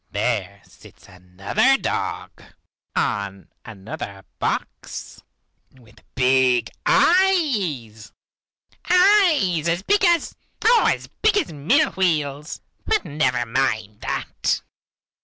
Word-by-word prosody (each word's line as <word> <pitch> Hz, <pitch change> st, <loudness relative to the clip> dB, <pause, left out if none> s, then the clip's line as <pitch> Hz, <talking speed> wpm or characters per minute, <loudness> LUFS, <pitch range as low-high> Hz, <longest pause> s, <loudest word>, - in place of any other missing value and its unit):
There 100 Hz, -2 st, -2 dB
sits -, -, -18 dB
another 95 Hz, -, 0 dB
dog, -, -, -4 dB, 0.5 s
on 100 Hz, -1 st, -2 dB
another 100 Hz, -2 st, -9 dB
box, -, -, -5 dB, 0.5 s
with 120 Hz, -4 st, -21 dB
big 125 Hz, -2 st, +2 dB, 0.2 s
eyes, 215 Hz, -, +1 dB, 0.8 s
eyes 350 Hz, -, +4 dB
as 170 Hz, +2 st, -1 dB
big 410 Hz, -, +2 dB
as 345 Hz, -3 st, +2 dB, 0.3 s
oh, 465 Hz, +1 st, +5 dB
as -, -, -4 dB
big 430 Hz, -1 st, 0 dB
as 335 Hz, -, -1 dB
mill 245 Hz, -, +2 dB
wheels, 150 Hz, -5 st, -2 dB, 0.3 s
but 435 Hz, -2 st, +1 dB
never 135 Hz, -5 st, 0 dB
mind 110 Hz, -3 st, -2 dB
that. -, -, -2 dB
140 Hz, 95 wpm, -22 LUFS, -, 0.8 s, oh